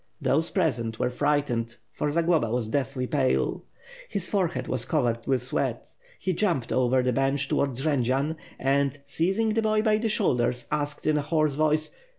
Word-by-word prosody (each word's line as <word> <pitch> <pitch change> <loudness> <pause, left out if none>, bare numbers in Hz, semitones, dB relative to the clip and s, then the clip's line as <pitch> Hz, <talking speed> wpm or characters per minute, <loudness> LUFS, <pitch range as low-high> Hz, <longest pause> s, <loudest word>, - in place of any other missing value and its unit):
Those 160 +4 +2
present 120 - 0
were 125 - 0
frightened, 125 -5 0 0.2
for 150 - -2
Zagloba 165 -5 +2
was 120 -1 -1
deathly 130 -1 -1
pale. 130 -1 0 0.4
His 195 -3 -2
forehead 185 -5 -1
was - - 0
covered 120 -7 0
with 130 -3 +1
sweat. 125 - -2 0.3
He 185 - -1
jumped 165 - 0
over 130 0 +2
the 125 0 +1
bench 135 +2 +1
towards 135 -2 0
Jendzian; 140 +1 +1 0.2
and, 140 +1 +1
seizing 190 +10 0
the 225 +1 +1
boy 215 -1 +2
by 215 -1 +3
the 225 0 0
shoulders, 125 - +1
asked 145 -1 -2
in 155 -1 +3
a - - 0
hoarse 155 0 +1
voice. 155 +1 +1
145 Hz, 165 wpm, -26 LUFS, 125-165 Hz, 0.4 s, by